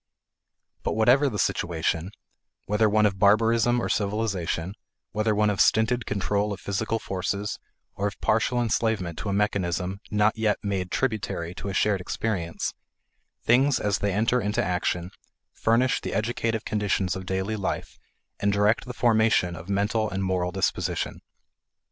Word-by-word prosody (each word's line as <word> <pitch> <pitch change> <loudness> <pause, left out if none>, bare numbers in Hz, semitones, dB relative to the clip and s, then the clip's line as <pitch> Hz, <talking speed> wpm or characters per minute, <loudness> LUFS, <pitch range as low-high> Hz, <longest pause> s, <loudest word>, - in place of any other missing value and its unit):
But - - -1
whatever 125 +6 +4
the 105 - -4
situation, 85 -1 -1 0.6
whether 105 +1 +2
one 105 +1 +3
of 95 -2 0
barbarism 115 +4 +4
or - - -1
civilization, 100 -4 -1 0.4
whether 110 0 +1
one 105 0 +3
of 100 - +1
stinted 110 +2 +3
control 100 +1 0
of 100 - -4
physical 110 +4 -1
forces, 100 +1 -3 0.3
or 100 - -1
of 100 - -7
partial 115 +3 +1
enslavement 110 -7 0
to 105 - -3
a - - 0
mechanism 95 -2 -1
not 105 +1 +2
yet 110 -2 +1
made 95 -3 -2
tributary 105 -9 -2
to 100 - -7
a 95 - -4
shared 100 -2 +2
experience, 90 -3 -2 0.7
things 130 +3 +4
as 100 -1 0
they 100 - 0
enter 115 +5 +2
into 105 +3 0
action 90 0 -1 0.4
furnish 120 +3 +2
the - - -4
educative 115 0 -1
conditions 100 -4 0
of 95 0 -7
daily 95 +3 -1
life 100 -3 -4 0.4
and 100 - +2
direct 105 +4 +2
the 125 -1 -7
formation 110 -6 +3
of 80 +3 -10
mental 105 +2 +1
and 95 -1 -2
moral 90 -1 0
disposition. 95 +1 -1
105 Hz, 150 wpm, -26 LUFS, 95-110 Hz, 0.7 s, whatever